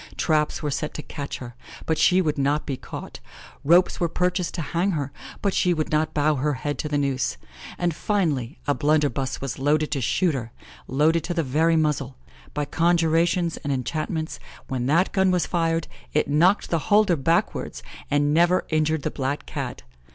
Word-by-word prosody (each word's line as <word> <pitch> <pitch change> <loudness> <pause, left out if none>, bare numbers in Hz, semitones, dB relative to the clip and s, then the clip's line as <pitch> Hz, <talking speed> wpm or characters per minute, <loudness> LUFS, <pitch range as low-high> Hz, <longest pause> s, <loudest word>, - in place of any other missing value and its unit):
Traps 155 -2 +1
were 150 - -1
set 150 +2 -3
to 150 - -5
catch 140 -1 -6
her, 120 -2 -9 0.3
but 160 - +1
she 185 +3 +4
would 150 -2 -1
not 145 +2 +1
be 140 - -2
caught; - - -8 0.4
ropes 170 +5 +4
were 170 - +1
purchased 180 +1 -1
to 170 - -2
hang 180 +3 +1
her, 145 -3 -2 0.3
but 200 -2 +1
she 180 -1 +2
would 155 -1 -2
not 155 0 +1
bow 150 0 +2
her 145 +2 0
head 145 +3 -4
to 150 - -3
the 145 - 0
noose; 130 - 0 0.4
and, 175 -1 0
finally, 155 - -1
a 145 - +2
blunderbuss 145 -3 0
was 135 -3 -4
loaded 150 +2 +1
to 140 - -1
shoot 170 +8 +1
her 115 -4 -4 0.4
loaded 155 +5 +2
to 175 - -3
the 165 - +1
very 160 +5 +2
muzzle. 145 -5 0 0.4
By 150 0 0
conjurations 170 +1 +2
and 145 - -4
enchantments, 155 +5 -3 0.3
when 130 -2 -2
that 170 +6 +3
gun 190 -1 +3
was 180 -2 +2
fired, 165 -2 0 0.3
it 150 - +2
knocked 170 +8 +3
the 165 - +2
holder 205 -3 +5
backwards, 165 +4 -1 0.3
and 145 0 +2
never 175 +3 +3
injured 155 -1 +1
the - - -1
black 140 +1 -3
Cat. - - -5
155 Hz, 185 wpm, -24 LUFS, 145-170 Hz, 0.4 s, holder